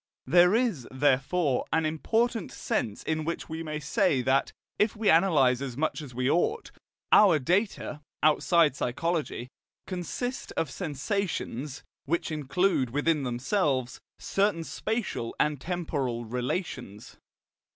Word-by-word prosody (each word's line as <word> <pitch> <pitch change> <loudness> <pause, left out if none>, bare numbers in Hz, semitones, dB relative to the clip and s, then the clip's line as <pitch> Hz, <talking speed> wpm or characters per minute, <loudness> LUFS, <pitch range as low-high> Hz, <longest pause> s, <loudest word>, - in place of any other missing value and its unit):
There 175 +7 +5
is, 225 - 0
therefore, 135 +2 +1
an 160 -1 +2
important 225 +8 0
sense 105 -2 -2
in 155 0 -1
which 165 +2 -4
we 160 0 -5
may 155 -2 -4
say 150 - +1
that, 130 +2 +2 0.3
if 210 +1 +2
we 215 -1 +1
analyse 150 -8 +4
as 130 -3 -5
much 155 +1 -1
as 130 -5 -10
we 125 +1 0
ought, 175 - +1 0.4
our 195 -6 +7
data, 175 - -1 0.2
outside 155 0 +4
psychology, 145 -1 -2 0.4
consist 195 +8 -4
of 155 - -2
sensations, 150 - -3 0.2
which 165 +3 -1
include 150 -1 +1
within 145 +4 +1
themselves 130 - -1 0.2
certain 195 -4 0
spatial 215 - -3
and 150 -3 +1
temporal 140 -8 -2
relations. 120 - -4
155 Hz, 120 wpm, -28 LUFS, 130-180 Hz, 0.4 s, our